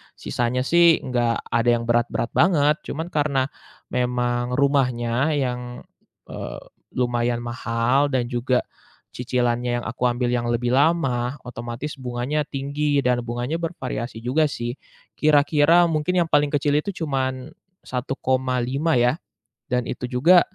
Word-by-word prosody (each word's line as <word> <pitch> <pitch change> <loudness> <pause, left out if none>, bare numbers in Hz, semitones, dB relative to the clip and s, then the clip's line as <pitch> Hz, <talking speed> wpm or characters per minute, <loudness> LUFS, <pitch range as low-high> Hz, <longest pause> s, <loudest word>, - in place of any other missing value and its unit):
Sisanya 125 +1 -1
sih 170 +3 +5
enggak 120 -2 0
ada 115 +1 +2
yang 115 - -3
berat-berat 120 0 +1
banget, 150 -4 +4
cuman 160 +3 -4
karena 140 -3 +1 0.4
memang 125 0 0
rumahnya 135 -1 +1
yang, 125 -3 -3 0.5
eee, - - -6 0.3
lumayan 120 -1 0
mahal 120 +3 +1
dan 125 -2 +1
juga 125 +1 +1 0.5
cicilannya 120 -1 0
yang - - -10
aku 125 +1 0
ambil 120 0 -1
yang 120 -1 0
lebih 120 +1 0
lama, 135 -5 +2
otomatis 120 +4 -6
bunganya 125 +4 -2
tinggi 140 +1 -1
dan 125 -1 +2
bunganya 120 +7 -2
bervariasi 130 -8 -4
juga 150 +6 +2
sih. 120 -4 -4 0.5
Kira-kira 150 +3 +5
mungkin 160 +3 0
yang 165 - -9
paling 145 0 +4
kecil 145 0 +1
itu 200 - -4
cuman 130 -2 -2 0.3
1,5 130 +3 -1
ya. 125 +3 +3 0.5
Dan 125 -1 0
itu 125 - -4
juga, 165 +9 +6
125 Hz, 130 wpm, -23 LUFS, 120-145 Hz, 0.5 s, juga